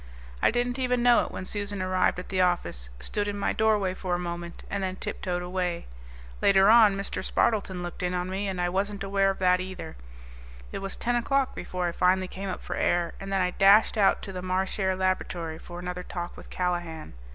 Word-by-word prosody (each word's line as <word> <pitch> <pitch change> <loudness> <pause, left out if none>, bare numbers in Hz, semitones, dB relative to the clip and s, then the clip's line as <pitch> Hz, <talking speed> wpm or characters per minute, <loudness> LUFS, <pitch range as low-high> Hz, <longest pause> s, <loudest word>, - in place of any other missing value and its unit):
I - - +5
didn't 245 +2 -1
even 250 -1 +1
know 245 -1 +6
it - - -5
when 185 - -6
Susan 205 0 -4
arrived 185 -1 +1
at 180 - -7
the 185 -1 +1
office, 175 - 0
stood 205 - -2
in 205 0 -3
my 200 - 0
doorway 210 -4 +2
for 185 -1 -2
a - - 0
moment, 170 -1 -6
and 200 - -3
then 185 -1 -2
tip - - -5
toed 180 -1 -2
away. 180 -1 -2 0.6
Later 195 +1 +6
on 220 -4 +7
Mr. 195 - -3
Spardleton 195 -5 0
looked 175 - -6
in 180 0 -1
on 180 0 -1
me, 195 +2 -2
and 190 -2 -3
I 175 - +1
wasn't 195 +2 -1
aware 195 0 +2
of 195 - -2
that, 180 -1 +3
either. 185 0 -6 0.8
It - - -4
was 195 0 -4
ten 245 +1 0
o'clock 270 +2 +1
before 180 -1 -3
I - - -1
finally 185 +2 +2
came 195 +1 -6
up - - -5
for - - -4
air, 175 -1 +1
and 195 0 -6
then 195 -1 +2
I 180 0 +1
dashed 200 +5 +5
out 200 -3 +3
to 195 - -6
the 180 - -4
Marchare 190 +1 0
Laboratory 175 -3 -1
for 175 - -10
another 180 0 -4
talk 175 -1 -6
with - - -12
Callahan. 175 - -3
185 Hz, 220 wpm, -27 LUFS, 180-200 Hz, 0.8 s, on